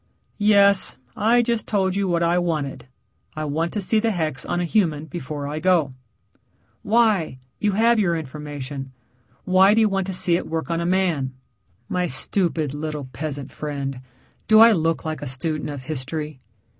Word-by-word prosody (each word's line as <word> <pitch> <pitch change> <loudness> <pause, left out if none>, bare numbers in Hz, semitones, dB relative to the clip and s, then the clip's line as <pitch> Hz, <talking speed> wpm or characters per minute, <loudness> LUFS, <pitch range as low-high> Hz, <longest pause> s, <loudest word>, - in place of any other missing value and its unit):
"Yes. 200 -2 +4 0.2
I 235 +3 +3
just 235 -2 -1
told 190 -3 +1
you 200 -1 0
what 170 -1 +1
I 170 +1 +2
wanted. 155 -7 -3 0.5
I 155 0 -3
want 160 +3 -1
to 210 - -1
see 215 +3 +1
the 225 +1 +1
hex 155 - -2
on 175 - -2
a 175 - 0
human 160 -5 +1
before 145 -2 -6
I 150 +2 -4
go." 165 -6 +2 0.9
"Why? 210 - +2 0.2
You 205 -1 +1
have 230 +3 +3
your 175 -5 +2
information. 145 -2 -7 0.5
Why 190 +2 +5
do 225 - +4
you 215 - +4
want 195 -1 -1
to 190 - -3
see 180 -1 +2
it - - -2
work 160 +1 -3
on 165 0 0
a 170 - -1
man?" 170 -8 0 0.5
"My 180 -1 -1
stupid, 160 0 0
little 150 -2 -5
peasant 145 -3 -4
friend, 140 -3 -5 0.5
do 215 0 +6
I 230 +1 +9
look 165 -5 0
like 155 0 -4
a 145 - -4
student 150 +4 -2
of 140 -3 -6
history?" 150 +1 -4
165 Hz, 175 wpm, -23 LUFS, 145-195 Hz, 0.9 s, I